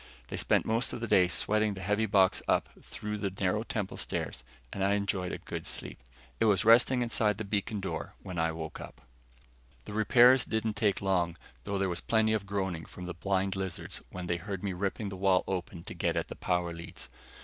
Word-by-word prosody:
They -, -, -4 dB
spent -, -, +2 dB
most 115 Hz, +3 st, +1 dB
of 120 Hz, -, -4 dB
the 115 Hz, -, -3 dB
day 90 Hz, -4 st, +5 dB
sweating 105 Hz, +3 st, +1 dB
the 95 Hz, -, -7 dB
heavy 105 Hz, +4 st, +1 dB
box 95 Hz, -3 st, +4 dB
up -, -, +2 dB
through 105 Hz, 0 st, -5 dB
the 100 Hz, -1 st, -1 dB
narrow 95 Hz, +2 st, 0 dB
temple 105 Hz, -4 st, -3 dB
stairs -, -, -3 dB, 0.3 s
and 95 Hz, -, -2 dB
I 100 Hz, +1 st, +3 dB
enjoyed 100 Hz, -3 st, -1 dB
a -, -, -3 dB
good -, -, -6 dB
sleep. -, -, -5 dB, 0.4 s
It 115 Hz, -, +3 dB
was 105 Hz, -1 st, +3 dB
resting 120 Hz, +2 st, +6 dB
inside 110 Hz, -3 st, +1 dB
the 110 Hz, -, -3 dB
beacon 100 Hz, +1 st, -1 dB
door 95 Hz, -, -4 dB
when 90 Hz, -2 st, -5 dB
I 80 Hz, 0 st, +2 dB
woke 80 Hz, -1 st, -6 dB
up. -, -, -10 dB, 0.8 s
The 105 Hz, -, -7 dB
repairs 120 Hz, +4 st, +6 dB
didn't 110 Hz, 0 st, -1 dB
take 105 Hz, -3 st, +1 dB
long, 90 Hz, -3 st, +1 dB, 0.3 s
though 100 Hz, -1 st, -1 dB
there 95 Hz, 0 st, +1 dB
was 85 Hz, -1 st, -1 dB
plenty 110 Hz, -1 st, +2 dB
of 100 Hz, -2 st, -1 dB
groaning 95 Hz, -5 st, -2 dB
from 90 Hz, -, -9 dB
the 90 Hz, -, -4 dB
blind 95 Hz, +2 st, 0 dB
lizards 95 Hz, -2 st, -4 dB
when 90 Hz, -1 st, -6 dB
they 85 Hz, 0 st, 0 dB
heard 100 Hz, +1 st, -5 dB
me 100 Hz, -2 st, -1 dB
ripping 100 Hz, +3 st, -2 dB
the 95 Hz, -, -6 dB
wall 95 Hz, -1 st, +3 dB
open 90 Hz, -2 st, -4 dB
to -, -, -7 dB
get 85 Hz, -1 st, 0 dB
at 85 Hz, -, -1 dB
the -, -, -6 dB
power 90 Hz, -1 st, -1 dB
leads. 85 Hz, 0 st, -8 dB
100 Hz, 215 wpm, -30 LUFS, 90-105 Hz, 0.8 s, resting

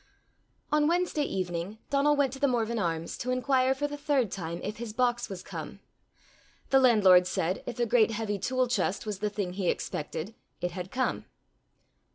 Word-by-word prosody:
On 300 Hz, 0 st, +3 dB
Wednesday 345 Hz, -2 st, +1 dB
evening 180 Hz, +1 st, -3 dB
Donal 285 Hz, +1 st, +4 dB
went 280 Hz, -3 st, +1 dB
to 270 Hz, -, -7 dB
The 285 Hz, -, +3 dB
Morven 235 Hz, -2 st, 0 dB
Arms 165 Hz, -3 st, -2 dB
to 250 Hz, -, -3 dB
inquire 255 Hz, +1 st, +2 dB
for 290 Hz, +2 st, -1 dB
the 290 Hz, 0 st, -6 dB
third 280 Hz, -8 st, +1 dB
time 170 Hz, -2 st, -4 dB
if 210 Hz, +1 st, -4 dB
his 225 Hz, -2 st, -6 dB
box 240 Hz, 0 st, +1 dB
was 185 Hz, -2 st, -7 dB
come. -, -, -7 dB, 0.9 s
The 270 Hz, -, +6 dB
landlord 195 Hz, -8 st, +6 dB
said, 180 Hz, +2 st, -1 dB
if 240 Hz, -, -5 dB
a 240 Hz, -, +3 dB
great 230 Hz, -1 st, +4 dB
heavy 215 Hz, -2 st, -2 dB
tool 255 Hz, +4 st, +1 dB
chest 200 Hz, -4 st, -1 dB
was 210 Hz, -3 st, -4 dB
the 210 Hz, +1 st, 0 dB
thing 200 Hz, -3 st, -3 dB
he 185 Hz, -2 st, -1 dB
expected, 160 Hz, +7 st, -3 dB, 0.3 s
it 180 Hz, -, -2 dB
had 180 Hz, +1 st, -6 dB
come. 255 Hz, +4 st, -1 dB
225 Hz, 185 wpm, -29 LUFS, 185-260 Hz, 0.9 s, The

